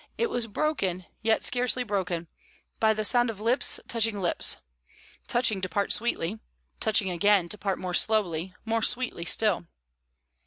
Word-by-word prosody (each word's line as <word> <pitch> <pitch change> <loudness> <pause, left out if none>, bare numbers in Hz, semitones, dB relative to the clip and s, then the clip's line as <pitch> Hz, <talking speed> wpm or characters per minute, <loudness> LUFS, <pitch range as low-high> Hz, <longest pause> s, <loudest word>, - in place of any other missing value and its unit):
It 465 -2 0
was 240 -2 -1
broken, 200 - -1 0.2
yet 225 0 +2
scarcely 250 0 +2
broken, 185 -6 -2 0.5
by 220 -1 +4
the 215 0 -1
sound 240 +1 +3
of 215 -3 -6
lips 235 +5 +2
touching 225 -3 0
lips 175 -3 +1 0.7
touching 230 -5 +1
to 185 - -3
part 200 +3 -1
sweetly, 220 -3 -1 0.4
touching 210 -3 +2
again 190 0 +3
to 210 - -3
part 195 -2 -1
more 180 -1 -5
slowly, 185 -4 +1
more 225 0 0
sweetly 240 -7 0
still. 200 -3 +1
210 Hz, 150 wpm, -27 LUFS, 185-230 Hz, 0.7 s, by